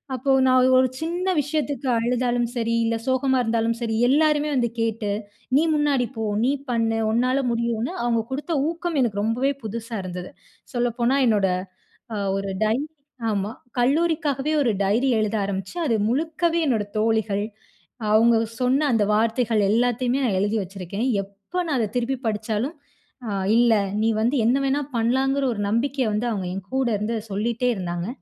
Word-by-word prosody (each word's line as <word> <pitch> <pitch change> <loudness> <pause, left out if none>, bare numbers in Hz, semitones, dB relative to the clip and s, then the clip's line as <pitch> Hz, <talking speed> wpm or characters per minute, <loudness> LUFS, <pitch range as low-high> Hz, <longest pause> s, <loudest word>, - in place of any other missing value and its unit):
அப்போ 265 +2 0 0.2
நான் 255 0 +5
ஒரு 255 0 +5
சின்ன 350 +3 -1
விஷயத்துக்கு 290 -1 -2
அழுதாலும் 240 +1 0
சரி, 230 -1 0
இல்ல 230 - +1
சோகமா 260 0 +2
இருந்தாலும் 230 0 0
சரி, 225 -1 -1
எல்லோருமே 300 +2 +3
வந்து 240 -2 +1
கேட்டு, 220 -2 -1 0.5
“நீ 305 - +4
முன்னாடி 285 -5 +2
போ, 225 - -2 0.2
நீ 265 - +3 0.2
பண்ணு, 225 -1 +1
உன்னால 255 +4 +2
முடியும்னு!” 235 0 -1
அவுங்க 230 -2 +1
குடுத்த 295 +5 -3 0.2
ஊக்கம் 340 -1 -3
எனக்கு 205 -5 0
ரொம்பவே 245 +5 +1
புதுசா 225 +1 -5
இருந்தது. 180 0 -6 0.4
சொல்லப்போனா 240 +2 +1
என்னோட 205 -4 +3 0.7
அ 210 - -2 0.2
ஒரு 195 0 -3
டைரி 235 +8 0 0.5
ஆமா 200 0 -1 0.3
கல்லூரிக்காகவே 300 0 +1
ஒரு 240 - +2
டைரி 225 +7 +2
எழுத 215 0 0
ஆரம்பிச்சு, 195 - -4
அது 235 - +2 0.2
முழுக்கவே 325 +4 0
என்னோட 225 -6 +1
தோழிகள், 220 -2 +1 0.7
அவங்க 230 +1 +5 0.2
சொன்ன 265 +4 +2
அந்த 215 -2 +3
வார்த்தைகள் 225 0 +1
எல்லாத்தையுமே 245 +3 +1
நான் 200 -6 +1
எழுதி 205 +3 0
வச்சுருக்கேன். 195 +5 -4 0.2
எப்ப 200 - -5
நான் 300 -4 0
அத 225 - +1
திருப்பி 245 +2 0
படிச்சாலும், 220 +6 -1 0.5
அ - - -2 0.3
இல்ல 240 -1 +5 0.3
நீ 225 - +3
வந்து 240 +6 +1
என்ன 240 +4 +3
வேண்ணா 275 +2 +1
பண்லாம்ங்குற 265 +4 +1
ஒரு 205 - -5
நம்பிக்கைய 260 +4 0
வந்து 215 +4 -1
அவுங்க 195 -4 -2
என் 195 -1 -6
கூட 265 -2 +1
இருந்து 220 +3 -2
சொல்லிட்டே 235 +5 -1
இருந்தாங்க. 175 -2 -4
235 Hz, 155 wpm, -23 LUFS, 220-270 Hz, 0.7 s, நான்